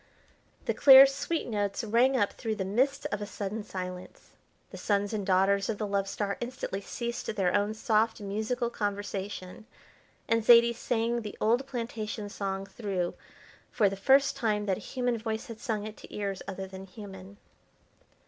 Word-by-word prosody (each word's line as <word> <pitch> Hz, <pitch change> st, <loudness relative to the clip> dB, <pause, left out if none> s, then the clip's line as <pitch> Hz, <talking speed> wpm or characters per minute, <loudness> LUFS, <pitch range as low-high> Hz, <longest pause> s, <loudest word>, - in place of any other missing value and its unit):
The -, -, +1 dB
clear, 270 Hz, -1 st, +10 dB
sweet 280 Hz, +4 st, -2 dB
notes 205 Hz, -1 st, -1 dB
rang 240 Hz, +5 st, +3 dB
up 205 Hz, -4 st, +1 dB
through 225 Hz, -2 st, -3 dB
the 195 Hz, -3 st, -3 dB
midst 270 Hz, +8 st, +1 dB
of 210 Hz, -, -2 dB
a 205 Hz, -, -4 dB
sudden 210 Hz, +1 st, -4 dB
silence. 180 Hz, -2 st, -7 dB, 0.4 s
The -, -, -8 dB
sons 205 Hz, 0 st, 0 dB
and 210 Hz, -2 st, -1 dB
daughters 195 Hz, +1 st, +2 dB
of 220 Hz, -, -1 dB
the 215 Hz, -, -2 dB
Love 200 Hz, -1 st, -1 dB
Star 200 Hz, -1 st, -2 dB
instantly 240 Hz, -5 st, -4 dB
ceased 235 Hz, +3 st, -5 dB
their 190 Hz, -3 st, +1 dB
own 205 Hz, +1 st, +1 dB
soft 220 Hz, +1 st, +1 dB
musical 220 Hz, +4 st, -2 dB
conversation, 205 Hz, -1 st, -4 dB, 0.6 s
and 230 Hz, -1 st, +2 dB
Zaidie 235 Hz, +1 st, +7 dB
sang 235 Hz, 0 st, -1 dB
the 210 Hz, -2 st, -7 dB
old 240 Hz, +5 st, +2 dB
plantation 225 Hz, -4 st, -4 dB
song 195 Hz, -1 st, -3 dB
through 195 Hz, -3 st, -3 dB, 0.6 s
for 205 Hz, -4 st, +3 dB
the 195 Hz, -, -5 dB
first 270 Hz, +8 st, +4 dB
time 210 Hz, -3 st, 0 dB
that 190 Hz, -2 st, 0 dB
a -, -, -10 dB
human 245 Hz, -2 st, -1 dB
voice 220 Hz, 0 st, -3 dB
had 230 Hz, -2 st, -9 dB
sung 215 Hz, -3 st, -2 dB
it 215 Hz, 0 st, -8 dB
to -, -, -13 dB
ears 200 Hz, -2 st, -3 dB
other 195 Hz, 0 st, -5 dB
than 190 Hz, 0 st, -10 dB
human. 195 Hz, 0 st, -11 dB
210 Hz, 170 wpm, -29 LUFS, 195-235 Hz, 0.6 s, clear